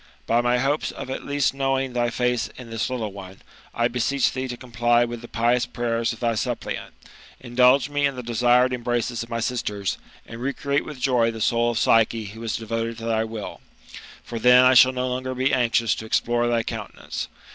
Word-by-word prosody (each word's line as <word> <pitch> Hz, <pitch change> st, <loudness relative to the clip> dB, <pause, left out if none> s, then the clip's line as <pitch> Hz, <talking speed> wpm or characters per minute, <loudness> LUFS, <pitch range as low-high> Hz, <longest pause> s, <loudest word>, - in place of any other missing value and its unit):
By 115 Hz, +1 st, +2 dB
my 120 Hz, 0 st, +2 dB
hopes 140 Hz, +4 st, 0 dB
of 130 Hz, -, -7 dB
at -, -, -5 dB
least 140 Hz, -1 st, +1 dB
knowing 135 Hz, -1 st, -1 dB
thy 120 Hz, -1 st, +1 dB
face 125 Hz, 0 st, 0 dB
in 120 Hz, -2 st, -10 dB
this 115 Hz, +1 st, -2 dB
little 115 Hz, -5 st, -3 dB
one, 95 Hz, -1 st, -11 dB, 0.3 s
I 120 Hz, 0 st, +1 dB
bMech 125 Hz, +3 st, 0 dB
thee 130 Hz, 0 st, -3 dB
to 120 Hz, -1 st, -6 dB
comply 120 Hz, 0 st, +1 dB
with 120 Hz, -1 st, -6 dB
the 120 Hz, -, -10 dB
pious 120 Hz, +1 st, +1 dB
prayers 115 Hz, -1 st, -1 dB
of 115 Hz, -, -8 dB
thy 115 Hz, -1 st, +1 dB
suppliant, 110 Hz, -, -4 dB, 0.4 s
indulge 125 Hz, +1 st, +3 dB
me 145 Hz, -1 st, +1 dB
in 140 Hz, -, -5 dB
the 125 Hz, -, -6 dB
desired 120 Hz, +2 st, +3 dB
embraces 120 Hz, -1 st, -2 dB
of 115 Hz, -, -7 dB
my 115 Hz, 0 st, -2 dB
sisters, 105 Hz, -5 st, -2 dB, 0.3 s
and 115 Hz, +1 st, -9 dB
recreate 140 Hz, +2 st, -1 dB
with 150 Hz, -4 st, -8 dB
joy 125 Hz, -3 st, +2 dB
the 115 Hz, -1 st, -6 dB
soul 115 Hz, +2 st, +2 dB
of 120 Hz, -, -2 dB
Psyche 115 Hz, -1 st, +3 dB
who 105 Hz, +3 st, -9 dB
is 115 Hz, -1 st, -2 dB
devoted 115 Hz, 0 st, -3 dB
to 115 Hz, -, -7 dB
thy 110 Hz, -1 st, +1 dB
will; 110 Hz, -2 st, -7 dB, 0.6 s
for 115 Hz, -, -6 dB
then 125 Hz, +2 st, +7 dB
I 130 Hz, -, +6 dB
shall 130 Hz, 0 st, +7 dB
no 130 Hz, 0 st, -2 dB
longer 130 Hz, +1 st, -3 dB
be 130 Hz, +2 st, +1 dB
anxious 115 Hz, -3 st, +2 dB
to 110 Hz, -, -7 dB
explore 120 Hz, +2 st, +1 dB
thy 120 Hz, -1 st, +1 dB
countenance. -, -, -6 dB
120 Hz, 205 wpm, -23 LUFS, 115-125 Hz, 0.6 s, then